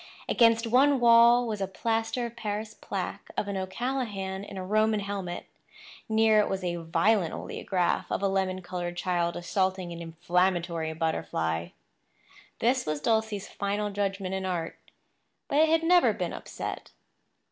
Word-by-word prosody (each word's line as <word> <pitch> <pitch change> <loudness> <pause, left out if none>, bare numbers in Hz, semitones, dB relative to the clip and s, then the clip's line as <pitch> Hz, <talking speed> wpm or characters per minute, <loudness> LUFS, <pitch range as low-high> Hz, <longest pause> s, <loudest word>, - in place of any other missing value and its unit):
Against 230 -1 +4
one 265 +4 +4
wall 235 +1 +6
was 210 -3 -3
a 195 - 0
plaster 225 +4 -1
of 235 0 -7
Paris 215 -1 -4
plaque - - -5
of 205 - -1
an 200 - -3
O'Callahan 195 -1 -3
in 200 -1 -9
a 185 - -4
Roman 215 +2 +2
helmet. 195 -3 -4 0.6
Near 220 -1 +4
it 210 - +2
was 190 -1 -2
a 175 -1 -1
violent 170 +3 +1
oleograph 180 -3 -1
of - - -1
a - - +4
lemon 190 -1 -1
coloured 175 -1 -4
child 175 -1 0
assaulting 185 0 -1
an 170 - -8
inflammatory 170 0 0
butterfly. 85 - -1 0.9
This 250 +2 +1
was 155 -1 -1
Dulcie's 220 +2 0
final 205 +1 -2
judgment 195 -1 -2
in 190 0 -2
art; 175 -3 -3 0.7
but 285 - +1
it 315 0 +5
had 325 0 +3
never 355 +1 +5
been - - -3
upset. - - -6
195 Hz, 150 wpm, -28 LUFS, 180-225 Hz, 0.9 s, wall